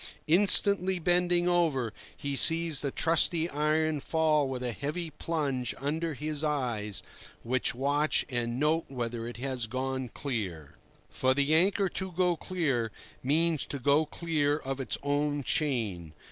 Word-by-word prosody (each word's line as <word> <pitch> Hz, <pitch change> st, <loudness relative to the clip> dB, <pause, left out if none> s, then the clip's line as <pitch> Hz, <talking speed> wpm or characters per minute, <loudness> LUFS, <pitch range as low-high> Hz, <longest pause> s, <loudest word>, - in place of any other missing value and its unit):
Instantly 190 Hz, +2 st, +4 dB
bending 175 Hz, 0 st, +2 dB
over, 155 Hz, -10 st, +1 dB, 0.2 s
he 140 Hz, -1 st, -3 dB
sees 165 Hz, 0 st, +3 dB
the 140 Hz, -, -1 dB
trusty 165 Hz, +2 st, +2 dB
iron 155 Hz, +1 st, +1 dB
fall 155 Hz, -2 st, +2 dB
with 130 Hz, -1 st, -4 dB
a 125 Hz, -, -1 dB
heavy 155 Hz, +7 st, -4 dB
plunge 140 Hz, -6 st, -2 dB
under 155 Hz, +3 st, -2 dB
his 150 Hz, +2 st, -2 dB
eyes, 120 Hz, -9 st, -1 dB, 0.4 s
which 125 Hz, +1 st, 0 dB
watch 145 Hz, +4 st, +1 dB
and 120 Hz, -2 st, -2 dB
note 155 Hz, +3 st, +2 dB
whether 120 Hz, -3 st, -4 dB
it 120 Hz, -, -7 dB
has 130 Hz, -2 st, -3 dB
gone 130 Hz, +1 st, -3 dB
clear. 95 Hz, -, -4 dB, 0.4 s
For 130 Hz, 0 st, +1 dB
the 140 Hz, +2 st, +2 dB
anchor 195 Hz, +4 st, +3 dB
"to 190 Hz, +1 st, -2 dB
go 180 Hz, 0 st, +2 dB
clear" 145 Hz, -, -1 dB, 0.3 s
means 160 Hz, +3 st, +1 dB
to 140 Hz, -, -4 dB
go 145 Hz, +4 st, +2 dB
clear 150 Hz, -3 st, 0 dB
of 135 Hz, -2 st, -4 dB
its 130 Hz, -, -2 dB
own 145 Hz, 0 st, 0 dB
chain. 110 Hz, -, -1 dB
145 Hz, 145 wpm, -29 LUFS, 130-165 Hz, 0.4 s, Instantly